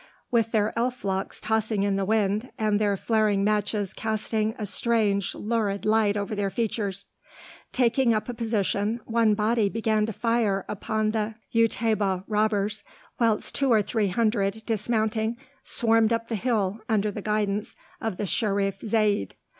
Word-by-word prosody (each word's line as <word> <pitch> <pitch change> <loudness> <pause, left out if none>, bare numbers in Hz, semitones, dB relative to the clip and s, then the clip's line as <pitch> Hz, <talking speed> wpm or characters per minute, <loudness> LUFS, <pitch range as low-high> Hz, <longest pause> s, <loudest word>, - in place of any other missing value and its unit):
with 230 -2 +2
their 215 -1 +1
elf 245 +1 -2
locks 190 0 -2
tossing 220 -2 0
in 200 -1 +1
the 195 - 0
wind, 210 +2 +1
and 210 -1 +1
their 205 -2 +1
flaring 215 -2 +1
matches 210 -1 0
casting 220 0 -1
a 215 - -3
strange 205 -2 +1
lurid 210 -3 -1
light 215 -1 +3
over 205 +1 -3
their 200 -1 -1
features. 200 -2 -2 0.7
Taking 250 0 +3
up 215 -1 0
a 245 - -3
position, 220 -1 -1
one 225 -2 +3
body 215 0 +2
began 220 0 0
to - - -2
fire 220 -3 0
upon 215 +1 -1
the 220 0 -2 0.2
Utaybah 215 -4 +1
robbers, 210 -1 0 0.4
whilst 225 -3 +1
two 275 -2 +1
or 215 -2 +5
three 215 0 0
hundred, 215 0 0
dismounting, 220 0 0 0.3
swarmed 225 -1 +3
up 230 0 -1
the 230 - -1
hill 215 -2 0
under 210 -1 +1
the 205 - -6
guidance 210 0 -1 0.3
of 225 -5 -3
the 205 - -2
Sherif 195 -1 0
Zayd. 210 - +1
215 Hz, 155 wpm, -26 LUFS, 205-225 Hz, 0.7 s, or